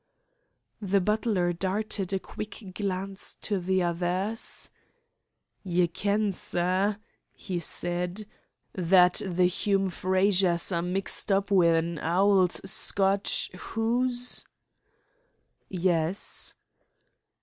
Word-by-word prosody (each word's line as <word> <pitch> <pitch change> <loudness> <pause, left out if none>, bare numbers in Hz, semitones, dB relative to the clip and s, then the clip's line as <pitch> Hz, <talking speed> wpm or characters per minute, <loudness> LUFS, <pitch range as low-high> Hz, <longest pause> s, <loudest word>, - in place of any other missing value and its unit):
The 200 -1 +1
butler 205 -3 0
darted 195 +2 -2
a 195 - +1
quick 205 0 -9
glance 195 0 -4
at 195 -3 0
the 190 0 +1
other. 175 +4 -1 1.3
"Ye 180 -2 +1
ken, 205 +4 0
sir," 185 +4 0 0.4
he 180 -3 -5
said, 175 +4 -2 0.5
"that 180 -1 +4
the 180 -1 +1
Hume 195 +1 0
Frazers 185 -1 +2
are 170 -1 0
mixed 190 +3 -1
up 195 +1 +1
wi' 185 -4 +5
an 165 0 -1
auld 185 +2 +3
Scoatch 195 +1 +3
hoose?" 245 +5 -1 1.3
"Yes." 175 0 0
190 Hz, 95 wpm, -27 LUFS, 180-200 Hz, 1.3 s, wi